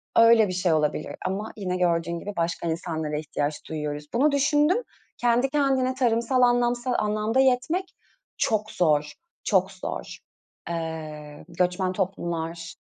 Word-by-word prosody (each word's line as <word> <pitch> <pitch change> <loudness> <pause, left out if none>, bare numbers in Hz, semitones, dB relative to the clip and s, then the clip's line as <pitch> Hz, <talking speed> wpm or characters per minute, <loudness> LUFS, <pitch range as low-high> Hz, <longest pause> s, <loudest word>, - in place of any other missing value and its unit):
öyle 230 -2 +7
bir 185 - -3
şey 180 -2 +1
olabilir. 150 0 0
Ama 200 +4 -3
yine 185 -2 -2
gördüğün 170 -1 0
gibi 205 +3 -6
başka 170 0 -1
insanlara 160 -2 -3
ihtiyaç 150 -1 -3
duyuyoruz. 150 -1 -4
Bunu 280 +5 +3
düşündüm. 295 - +3 0.3
Kendi 245 +2 +2
kendine 270 -3 +2
tarımsal 245 0 +2
anlamsal 245 0 +2
anlamda 215 +4 0
yetmek 265 +8 +2 0.5
çok 215 -1 0
zor. 150 -3 +2 0.3
Çok 190 -1 +2
zor. 185 - -6 0.5
Iıı, 155 -3 -6
göçmen 180 +2 0
toplumlar 170 -3 -3
190 Hz, 125 wpm, -25 LUFS, 165-245 Hz, 0.5 s, öyle